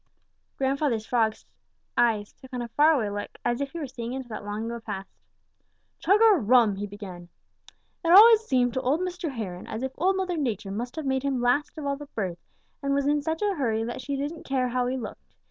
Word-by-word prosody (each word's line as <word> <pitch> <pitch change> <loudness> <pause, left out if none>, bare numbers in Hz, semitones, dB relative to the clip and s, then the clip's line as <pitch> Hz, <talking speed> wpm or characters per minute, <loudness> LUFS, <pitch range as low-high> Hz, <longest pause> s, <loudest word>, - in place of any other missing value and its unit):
Grandfather 270 -2 +1
Frog's 220 0 0 0.5
eyes 220 -4 +2
took 260 - -16
on 250 -1 -3
a 235 - -7
far 300 +7 +5
away 215 -7 -1
look, 205 0 -6
as 240 +2 0
if 280 - -2
he 340 - -8
were 315 - -3
seeing 245 -2 -6
into 265 -1 -5
that 215 - -6
long 205 +2 -4
ago 235 +1 -4
past. 200 -4 -6 0.9
"Chug 400 +3 +4
a 435 -4 +7
rum!" 230 -5 +4
he 205 +1 -3
began. 190 -4 -9 0.7
"It 335 - +2
always 440 +4 +10
seemed 250 - +1
to 260 - -1
old 275 +6 +1
Mr. 360 -2 -3
Heron 200 -9 -6
as 220 +3 -5
if 265 - -2
Old 375 +4 +3
Mother 365 -2 -1
Nature 220 -8 -2
must 240 +5 -4
have 315 -2 -4
made 265 -1 +1
him 275 -2 -1
last 245 +7 +1
of 305 - -5
all 280 0 -1
the 290 0 -9
birds 185 -5 -3 0.4
and 275 0 0
was 280 0 +1
in 295 +1 +2
such 320 +5 -2
a 410 -1 +2
hurry 230 - 0
that 240 +2 -4
she 280 +2 -3
didn't 290 +4 -4
care 260 -2 0
how 250 0 0
he 260 +1 -1
looked. 225 -4 -9
255 Hz, 225 wpm, -26 LUFS, 225-290 Hz, 0.9 s, always